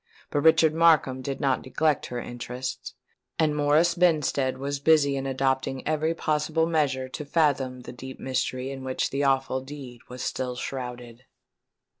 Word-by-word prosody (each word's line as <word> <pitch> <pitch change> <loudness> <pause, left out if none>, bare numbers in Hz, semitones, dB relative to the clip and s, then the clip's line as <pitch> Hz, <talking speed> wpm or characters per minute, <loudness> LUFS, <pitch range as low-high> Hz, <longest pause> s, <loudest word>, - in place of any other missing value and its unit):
But 145 - +1
Richard 160 0 +5
Markham 155 -5 +4
did 135 +1 -4
not 135 -3 +1
neglect 150 +2 0
her 125 - -4
interests; 125 +2 -6 0.4
and 155 -2 +2
Morris 150 +4 +3
Benstead 150 -6 +2
was 140 +1 -3
busy 140 -1 +4
in 135 0 -3
adopting 130 0 -1
every 155 +1 0
possible 155 +1 0
measure 145 -6 0
to 140 - -6
fathom 140 -4 +1
the 125 - -9
deep 130 +2 -9
mystery 130 0 -2
in 135 -1 -7
which 130 0 -2
the 140 +1 -1
awful 135 -1 +1
deed 130 -3 -10
was 125 +1 -6
still 125 -1 -3
shrouded. 125 -1 -6
135 Hz, 155 wpm, -26 LUFS, 130-150 Hz, 0.4 s, Richard